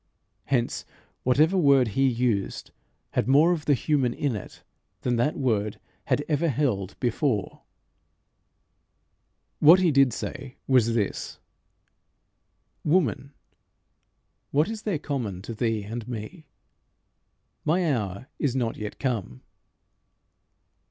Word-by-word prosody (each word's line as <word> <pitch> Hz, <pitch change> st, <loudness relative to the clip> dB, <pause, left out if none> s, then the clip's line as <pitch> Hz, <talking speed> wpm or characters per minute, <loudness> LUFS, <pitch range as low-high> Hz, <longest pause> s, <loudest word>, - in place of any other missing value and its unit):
Hence 120 Hz, -3 st, 0 dB, 0.4 s
whatever 150 Hz, +8 st, +3 dB
word 140 Hz, -8 st, +4 dB
he 135 Hz, +6 st, +2 dB
used 115 Hz, -5 st, -1 dB, 0.4 s
had -, -, 0 dB
more 145 Hz, +6 st, +5 dB
of 160 Hz, -3 st, -2 dB
the 145 Hz, -, +4 dB
human 130 Hz, -2 st, 0 dB
in 140 Hz, -6 st, -1 dB
it 105 Hz, -, -9 dB, 0.4 s
than 125 Hz, -, 0 dB
that 135 Hz, +6 st, +1 dB
word 110 Hz, -6 st, 0 dB, 0.3 s
had 145 Hz, -, 0 dB
ever 160 Hz, +2 st, +1 dB
held 115 Hz, -9 st, -1 dB
before. 120 Hz, -3 st, -1 dB, 2.0 s
What 165 Hz, +5 st, +8 dB
he 180 Hz, -3 st, +3 dB
did 135 Hz, -2 st, +4 dB
say 130 Hz, +3 st, -6 dB
was 115 Hz, -3 st, +3 dB
this 105 Hz, -4 st, -2 dB, 1.5 s
"Woman, 145 Hz, -, +1 dB, 1.2 s
what 150 Hz, +6 st, +2 dB
is 220 Hz, -1 st, -5 dB
there 205 Hz, -7 st, -1 dB
common 120 Hz, -, -4 dB
to 115 Hz, -, -6 dB
thee 115 Hz, -2 st, -1 dB
and 110 Hz, +2 st, -6 dB
me? 125 Hz, -, -7 dB, 1.2 s
My 165 Hz, 0 st, +2 dB
hour 100 Hz, +1 st, -4 dB
is 135 Hz, -4 st, 0 dB
not 120 Hz, -3 st, -1 dB
yet 105 Hz, -1 st, -6 dB
come." 110 Hz, -, -3 dB
130 Hz, 115 wpm, -26 LUFS, 115-150 Hz, 2.0 s, What